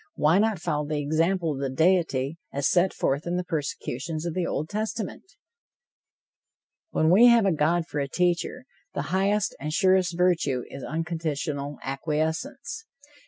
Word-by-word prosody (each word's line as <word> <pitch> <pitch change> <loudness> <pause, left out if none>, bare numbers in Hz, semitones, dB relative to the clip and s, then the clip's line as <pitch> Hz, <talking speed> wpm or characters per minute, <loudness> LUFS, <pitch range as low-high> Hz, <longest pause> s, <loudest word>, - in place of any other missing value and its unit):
Why 160 +5 +4
not 220 -1 +2
follow 150 -3 -2
the 155 0 -1
example 165 +4 +1
of 135 - -6
the 135 -1 -1
deity, 160 -1 +1
as 140 0 0
set 185 +1 +3
forth 140 +5 -1
in 175 - -1
the 180 - -1
persecutions 155 -1 -4
of 170 - -2
the 180 0 -1
Old 155 - -2
Testament? 215 +1 -3 1.7
When 160 - +2
we 225 +7 +8
have 235 -3 +6
a 195 - +3
God 165 +2 +1
for 150 - -4
a 140 - -1
teacher, 180 - -1 0.3
the 140 - -1
highest 200 +2 +1
and 150 +2 -4
surest 185 0 +3
virtue 165 -8 +2
is 135 - -8
unconditional 155 -3 -3
acquiescence. 160 - -3
165 Hz, 155 wpm, -26 LUFS, 150-185 Hz, 1.7 s, we